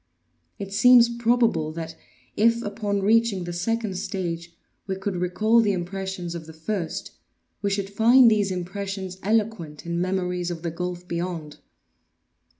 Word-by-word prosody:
It 200 -2 -6
seems 240 +3 +7
probable 230 -9 +2
that 165 0 -6 0.4
if, 230 +2 +3
upon 205 -1 -2
reaching 220 -2 +3
the 175 0 -5
second 200 +1 -2
stage, 170 -4 -4 0.4
we 190 - -1
could 190 0 -3
recall 180 +6 +2
the 210 -3 +3
impressions 185 -1 -4
of 165 -2 -7
the 160 - -10
first, 165 +2 -4 0.5
we 200 - 0
should 200 0 -1
find 235 +3 +6
these 205 -2 +2
impressions 190 +1 -5
eloquent 205 -8 -1
in 170 0 -2
memories 180 -1 -1
of 170 -1 -6
the 170 - -2
gulf 180 +1 -5
beyond. 170 -4 -4
190 Hz, 145 wpm, -25 LUFS, 175-215 Hz, 0.5 s, seems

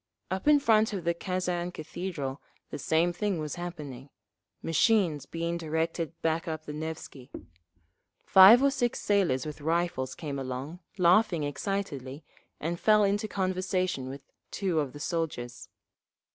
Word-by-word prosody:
Up 190 +8 -3
in 300 -1 +7
front 220 -5 +3
of 190 -4 -3
the 170 +1 +1
Kazan 180 0 -2
Cathedral 155 -4 -5 0.3
the - - -5
same 165 +4 +2
thing 200 +1 -1
was 155 -2 -4
happening, 150 -7 -7 0.5
machines 165 -1 +2
being 170 +1 -3
directed 165 0 -2
back 165 +2 0
up 155 -1 -4
the 150 - -6
Nevsky. 150 -4 -7 1.0
Five 200 +7 +9
or 280 - +4
six 245 -3 -1
sailors 185 -11 +1
with 150 -1 -7
rifles 165 -4 -1
came 145 -4 -5
along, 135 +6 -5 0.2
laughing 180 -2 +4
excitedly, 145 -3 -4 0.4
and 170 +2 -3
fell 215 -1 +5
into 205 +2 +1
conversation 185 -7 -1
with 135 0 -8 0.3
two 185 -5 -1
of 145 -4 -2
the 145 - -9
soldiers. 145 -8 -4
170 Hz, 140 wpm, -29 LUFS, 150-190 Hz, 1.0 s, Five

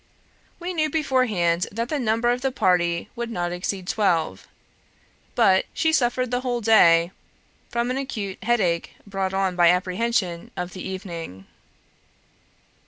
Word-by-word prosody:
We 360 +1 -4
knew 310 -2 +1
beforehand 225 - +1
that 230 +3 -3
the 300 - -1
number 230 0 +1
of 245 +1 -1
the 270 0 0
party 175 -7 +1
would 235 -1 -4
not 175 -6 -2
exceed 180 +1 -4
twelve; 165 - 0 0.9
but 190 0 +4
she 320 -1 +1
suffered 250 -3 +1
the 245 0 0
whole 245 -2 -1
day 170 -6 +5 0.6
from 235 +1 -1
an 255 - -2
acute 215 -8 -5
headache 190 -8 0
brought 195 -2 -2
on 190 -2 0
by 175 -1 +5
apprehension 185 0 0
of 180 0 -4
the 185 - -8
evening. 170 - -7
200 Hz, 140 wpm, -24 LUFS, 175-245 Hz, 0.9 s, day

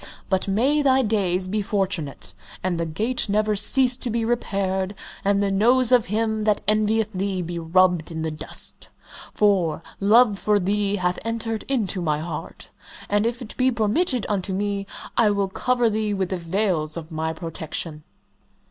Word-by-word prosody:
But 190 +1 +2
may 260 +10 +2
thy 265 -2 +4
days 190 -4 0
be 210 +3 -1
fortunate, 190 - -2 0.3
and 180 -2 -1
the 170 - -1
gate 220 +9 -1
never 210 +1 +2
cease 250 +4 +3
to 250 - -3
be 230 0 -1
repaired, 195 -4 -1 0.3
and 200 0 +2
the 200 - 0
nose 240 +5 +3
of 245 -3 +4
him 220 +1 0
that 210 -2 +2
envieth 215 0 +2
thee 190 -1 -2
be 170 0 -4
rubbed 175 0 +2
in 160 -1 -4
the 160 - -2
dust, 155 +1 -1 0.4
for 180 -6 +1 0.2
love 210 0 +4
for 210 -1 +2
thee 200 +1 0
hath 180 -2 -1
entered 225 -1 -3
into 215 -8 0
my 155 -3 0
heart, 160 0 -7 0.4
and 205 +2 +2
if 240 +1 -3
it 220 - -9
be 260 0 +3
permitted 235 - 0
unto 195 -2 -1
me, 200 0 -2 0.3
I 225 -3 +5
will 200 -1 0
cover 245 +4 +1
thee 215 -1 0
with 190 -2 -1
the 185 - -2
veils 170 -3 -1
of 165 0 -8
my 160 0 -2
protection!" 160 -1 -5
200 Hz, 170 wpm, -23 LUFS, 180-220 Hz, 0.4 s, I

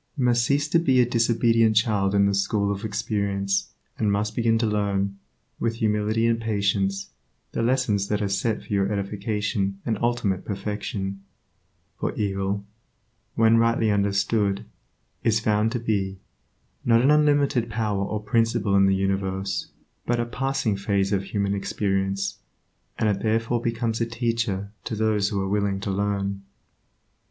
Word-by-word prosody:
You 130 - +1
must 120 -1 +3
cease 145 +3 +1
to 170 - +4
be 135 -6 +3
a 125 - +6
disobedient 115 -1 +3
child 105 -3 +2
in 100 0 +5
the 100 - +2
school 100 +1 +1
of 100 +1 -4
experience 100 -2 -1 0.3
and 105 -2 +2
must 105 +2 -1
begin 115 -1 +2
to 115 - +1
learn, 100 -2 -1 0.4
with 115 0 0
humility 110 0 +1
and 115 0 +1
patience, 100 -2 0 0.4
the - - -2
lessons 115 -5 +1
that 105 0 0
are 105 - 0
set 100 +3 -1
for - - -6
your 100 0 +1
edification 100 0 -2
and 110 -3 -1
ultimate 115 -6 0
perfection; 100 -1 -4 0.8
for - - -2
evil, 100 0 -2 0.7
when 115 0 +5
rightly 115 -1 +3
understood, 100 0 +1 0.6
is 110 -1 +3
found 110 0 +1
to 120 - -1
be, 100 -4 -1 0.7
not 115 0 +4
an 140 - +5
unlimited 145 -5 +3
power 105 -3 -1
or 105 +1 -3
principle 115 -2 +1
in 95 0 +5
the 95 - +3
universe, 95 0 -1 0.4
but 120 0 +1
a 120 - 0
passing 125 -3 -1
phase 100 0 0
of 95 -1 0
human 100 0 -1
experience, 100 0 -1 0.6
and 110 - +1
it 100 -2 0
therefore 115 +2 0
becomes 115 -1 -1
a 115 - +1
teacher 115 -4 -2
to 110 - -4
those 105 -2 +1
who 100 -3 -2
are 95 - -1
willing 100 -1 0
to 100 0 -3
learn. 100 0 -1
105 Hz, 155 wpm, -25 LUFS, 100-115 Hz, 0.8 s, a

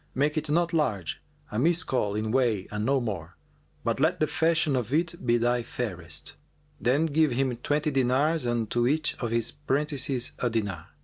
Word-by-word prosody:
Make 145 +4 +1
it 155 -1 -2
not 170 +2 +2
large, 110 - 0 0.3
a 105 - -3
Miskбl[FN#403] 130 - +1
in 110 0 -1
weight 115 -7 +1
and 105 0 -2
no 135 +4 +2
more; 95 -8 -5 0.5
but 115 +2 0
let 165 +5 +2
the 155 - +4
fashion 160 -2 +1
of 125 -2 -2
it 170 +3 0
be 120 -1 +3
thy 120 +1 +2
fairest.' 95 -9 -4 0.5
Then 140 +6 +2
give 155 -3 +2
him 130 0 0
twenty 150 +5 0
dinars 135 +3 +2
and 120 -2 0
to 120 0 +2
each 150 +3 +1
of 120 - -2
his 115 0 0
prentices 140 -3 -1
a 125 - +1
dinar. 105 -8 -2
130 Hz, 180 wpm, -27 LUFS, 115-150 Hz, 0.5 s, the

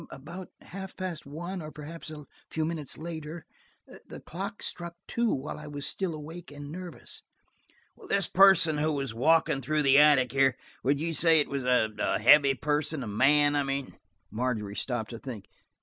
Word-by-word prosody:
"About 170 +7 -9
half 190 +1 -9
past 180 -6 -5
one 175 +6 -6
or 155 - -7
perhaps 155 +2 -8
a 150 -2 -9 0.2
few 160 -1 -1
minutes 155 -4 -3
later. 160 0 -7 0.6
The - - -9
clock 200 +6 -6
struck 170 0 -4
two 235 -1 0
while 135 +3 -4
I 150 - -9
was 145 -1 -6
still 185 -4 -2
awake 160 +2 -9
and 145 0 -9
nervous." 180 +1 -8 0.9
"This 200 -3 +2
person 180 -5 +5
who 155 +1 +1
was 135 -5 -3
walking 145 +2 +3
through 155 +1 0
the 140 0 +6
attics 140 -5 +5
here–would 135 +1 0
you 165 +2 -2
say 165 0 +5
it 145 - +1
was 140 -2 -2
a 110 -4 +1
heavy 140 +4 +6
person? 150 +1 -1
A - - -6
man, 145 +7 +4
I 145 - +3
mean?" 135 -1 -4 0.3
Margery 110 -4 -2
stopped 120 -4 -3
to 115 - -7
think. 115 -7 -8
150 Hz, 170 wpm, -28 LUFS, 135-165 Hz, 0.9 s, the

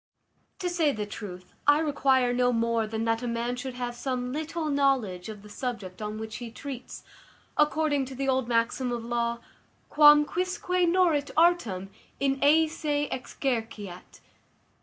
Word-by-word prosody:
To 360 - -3
say 340 -4 +2
the 215 -4 -3
truth, 185 -3 -9
I 290 0 +7
require 270 -5 +2
no 245 0 +3
more 230 -1 +1
than 220 +1 -3
that 225 0 +1
a 245 - -3
man 235 +1 -1
should 250 0 -6
have 245 -1 -3
some 250 0 -3
little 315 +2 -3
knowledge 255 -10 +1
of 210 -2 -9
the - - -12
subject 210 -5 -5
on 210 0 -4
which 220 0 -6
he 240 -1 -7
treats, 255 +2 -8 0.5
according 300 -2 +2
to 260 0 -8
the 270 +1 -2
old 260 -2 +1
maxim 240 +2 0
of 235 -1 -3
law, 235 0 -1 0.5
Quam 295 0 +7
quisque 365 +3 -3 0.2
nôrit 335 -5 +2
artem 235 - +2 0.3
in 275 -1 +1
eâ 315 +3 +5
se 295 -2 -2
exerceat. 225 -8 -4
250 Hz, 160 wpm, -27 LUFS, 230-290 Hz, 0.5 s, I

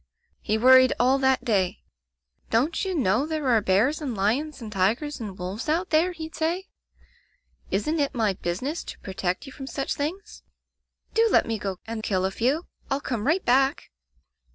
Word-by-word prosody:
"He 215 - 0
worried 255 +2 +7
all 260 +3 +4
that 265 -1 +2
day. 195 -6 0 0.7
'Don't 260 +9 +1
you 380 -2 -2
know 245 - +2
there 310 -3 -2
are 225 -3 +4
bears 215 +12 +2
and 265 -6 -3
lions 260 +10 0
and 220 -3 -8
tigers 230 +11 0
and 205 -5 -6
wolves 190 +10 -5
out 345 +5 0
there?' 330 +3 +3
he'd 320 -2 -8
say 335 +4 -1 0.4
— - - -33
* - - -52 0.2
Isn't 305 +12 0
it 280 -1 0
my 220 -4 +1
business 190 - -3
to - - -8
protect 185 +3 -3
you 275 - -10
from 265 0 -8
such 275 0 -2
things? 360 +9 -5 0.7
Do 455 0 +4
let - - +4
me 225 -2 -2
go 195 -2 -3
and 225 0 -5
kill 190 -3 0
a 190 - 0
few. 265 - 0 0.2
I'll 275 0 0
come 240 -5 -3
right 340 +5 +2
back!' 270 +3 +2
260 Hz, 185 wpm, -25 LUFS, 210-310 Hz, 0.7 s, worried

